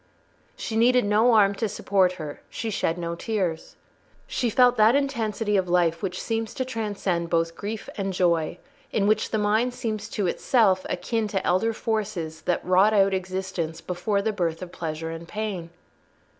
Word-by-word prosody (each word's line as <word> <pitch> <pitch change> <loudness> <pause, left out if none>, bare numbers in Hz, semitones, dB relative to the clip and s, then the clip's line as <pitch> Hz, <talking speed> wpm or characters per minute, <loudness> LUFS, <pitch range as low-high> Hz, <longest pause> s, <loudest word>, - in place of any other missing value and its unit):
She 220 - -5
needed 245 +1 +4
no 215 +4 +4
arm 200 -2 +5
to 220 +2 -2
support 190 -2 +2
her; 155 -5 -7
she 225 - -4
shed 175 -4 0
no 170 -1 -3
tears. 180 -3 -3 0.5
She 245 - -1
felt 245 +2 +5
that 220 +3 +6
intensity 225 -6 0
of 185 -2 0
life 170 -2 +2
which 185 -2 -3
seems 225 -1 -3
to 260 - -1
transcend 205 -8 -2
both 165 0 0
grief 210 +1 -5
and 195 -1 -1
joy—in 175 +3 -1
which 215 +1 +2
the 220 - 0
mind 220 +4 +1
seems 215 -3 -3
to 205 -4 -2
itself 190 0 +2
akin 220 +4 -1
to 195 -2 -2
elder 190 +6 +2
forces 205 -8 -3
that 175 - 0
wrought 190 +4 +4
out 195 -1 +4
existence 185 -3 -3
before 190 +4 -1
the 220 0 0
birth 170 -3 -2
of 175 - -9
pleasure 160 -1 -4
and 165 +1 -8
pain. 200 -5 -4
200 Hz, 170 wpm, -25 LUFS, 175-220 Hz, 0.5 s, that